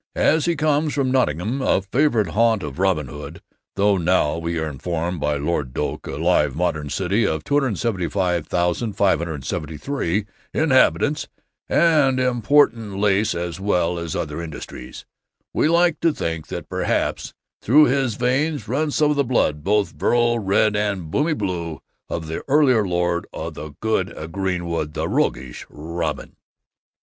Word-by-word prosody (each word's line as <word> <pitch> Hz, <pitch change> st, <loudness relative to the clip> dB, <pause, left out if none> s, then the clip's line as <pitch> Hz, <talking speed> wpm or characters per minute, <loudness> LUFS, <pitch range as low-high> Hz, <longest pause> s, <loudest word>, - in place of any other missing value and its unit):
As 155 Hz, 0 st, +3 dB
he 170 Hz, -1 st, +1 dB
comes 150 Hz, 0 st, +1 dB
from 135 Hz, -3 st, +1 dB
Nottingham, 120 Hz, -, 0 dB
a 95 Hz, -, +2 dB
favorite 115 Hz, -, +1 dB
haunt 110 Hz, +2 st, +2 dB
of -, -, -6 dB
Robin 95 Hz, -6 st, +1 dB
Hood, 75 Hz, +4 st, -9 dB, 0.4 s
though 100 Hz, 0 st, +3 dB
now, 85 Hz, -3 st, +2 dB
we 85 Hz, 0 st, -3 dB
are 80 Hz, -1 st, -1 dB
informed 85 Hz, +4 st, -3 dB
by 75 Hz, 0 st, 0 dB
Lord 70 Hz, -3 st, -2 dB
Doak, -, -, -3 dB
a -, -, -5 dB
live 75 Hz, -3 st, +2 dB
modern 80 Hz, -3 st, -1 dB
city 95 Hz, +7 st, 0 dB
of 80 Hz, -1 st, -2 dB
275,573 90 Hz, -, -1 dB, 0.3 s
inhabitants, 145 Hz, 0 st, +3 dB, 0.4 s
and 150 Hz, -6 st, +3 dB
important 120 Hz, -4 st, +2 dB
lace 105 Hz, 0 st, +2 dB
as 85 Hz, +1 st, -4 dB
well 90 Hz, -3 st, 0 dB
as 85 Hz, -2 st, -4 dB
other 75 Hz, +1 st, -3 dB
industries, 75 Hz, -5 st, -8 dB, 0.5 s
we -, -, +2 dB
like 170 Hz, -1 st, +3 dB
to 165 Hz, -, +3 dB
think 80 Hz, -, -4 dB
that -, -, -6 dB
perhaps -, -, -2 dB, 0.3 s
through 150 Hz, +7 st, +6 dB
his 130 Hz, -3 st, +1 dB
veins 130 Hz, +1 st, 0 dB
runs 145 Hz, +5 st, -1 dB
some 150 Hz, -1 st, +3 dB
of 150 Hz, -, -1 dB
the 140 Hz, -, +3 dB
blood, 75 Hz, -, 0 dB
both 105 Hz, +2 st, +1 dB
virile 120 Hz, 0 st, +1 dB
red 105 Hz, +1 st, +2 dB
and 100 Hz, -6 st, -2 dB
bonny 155 Hz, +3 st, +1 dB
blue, 85 Hz, -, -3 dB, 0.3 s
of 80 Hz, -, -3 dB
that 80 Hz, +1 st, -5 dB
earlier 130 Hz, -7 st, +4 dB
lord 85 Hz, -1 st, 0 dB
o' 80 Hz, +2 st, -5 dB
the 75 Hz, -1 st, -9 dB
good 110 Hz, 0 st, -1 dB
greenwood, 85 Hz, -4 st, -2 dB
the -, -, -1 dB
roguish 65 Hz, 0 st, -2 dB
Robin. 80 Hz, +1 st, -5 dB
95 Hz, 145 wpm, -22 LUFS, 85-130 Hz, 0.5 s, through